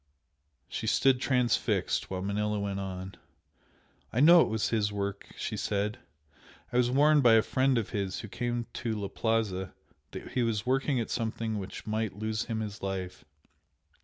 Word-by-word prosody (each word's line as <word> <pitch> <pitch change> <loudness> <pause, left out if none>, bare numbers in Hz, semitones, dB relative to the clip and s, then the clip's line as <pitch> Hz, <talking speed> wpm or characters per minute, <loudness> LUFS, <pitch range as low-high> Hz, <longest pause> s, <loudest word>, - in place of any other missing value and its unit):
She - - -4
stood 130 -2 +3
transfixed, 125 -3 +1
while 95 -1 -3
Manella 105 +1 -1
went 100 -1 -2
on 95 -1 -6 0.9
"I 115 - -1
know 170 +4 +8
it - - +3
was 110 -1 -1
his 105 -2 +1
work!" 100 -1 -4
she - - -3
said 105 +2 -1 0.7
"I - - +2
was 125 -1 +3
warned 145 +3 +5
by 120 -3 +6
a 110 -1 +6
friend 130 -1 +2
of 115 - -2
his 100 -2 -2
who - - -7
came 120 +3 -2
to 115 -3 -2
'la 100 -1 -3
Plaza' 105 -5 -1 0.3
that - - -8
he 125 - 0
was 110 -3 0
working 135 +1 +1
at 115 - -3
something 110 -2 -2
which 95 0 -7
might 110 -2 -2
lose 110 0 -2
him 110 -1 -3
his 105 -1 -6
life. 95 -2 -4
110 Hz, 170 wpm, -29 LUFS, 100-120 Hz, 0.9 s, know